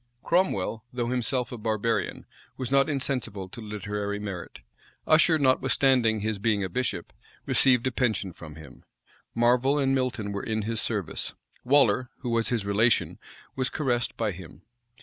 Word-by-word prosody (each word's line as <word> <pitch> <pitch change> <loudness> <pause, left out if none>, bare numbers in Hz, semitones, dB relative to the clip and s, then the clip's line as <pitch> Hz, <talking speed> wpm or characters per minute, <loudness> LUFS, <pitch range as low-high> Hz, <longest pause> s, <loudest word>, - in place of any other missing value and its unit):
Cromwell, 115 - 0
though 120 -1 -2
himself 125 0 -1
a 125 - -6
barbarian 110 +1 -1 0.3
was 130 -1 -4
not 140 +2 +4
insensible 125 -9 -2
to 115 - -9
literary 105 -1 -4
merit. 100 -4 -7 0.4
Usher, 160 +1 +5
notwithstanding 130 -4 +2
his 110 -1 -2
being 105 -1 +1
a 95 - -3
bishop, 90 -4 -3 0.3
received 125 -3 +3
a 130 - +1
pension 110 -7 -1
from 80 -3 -11
him. 75 -4 -13 0.5
Marvel 125 +4 +3
and 135 -2 +2
Milton 125 -6 -1
were 100 0 -3
in 110 -1 -2
his 115 +1 +1
service. 105 -7 0 0.3
Waller, 125 -2 +4
who 125 -2 -3
was 115 -1 +1
his 115 -5 -1
relation, 110 +4 +2 0.4
was 130 -1 0
caressed 120 -5 -1
by 110 -3 0
him. 90 -2 -12
115 Hz, 150 wpm, -27 LUFS, 105-130 Hz, 0.5 s, Usher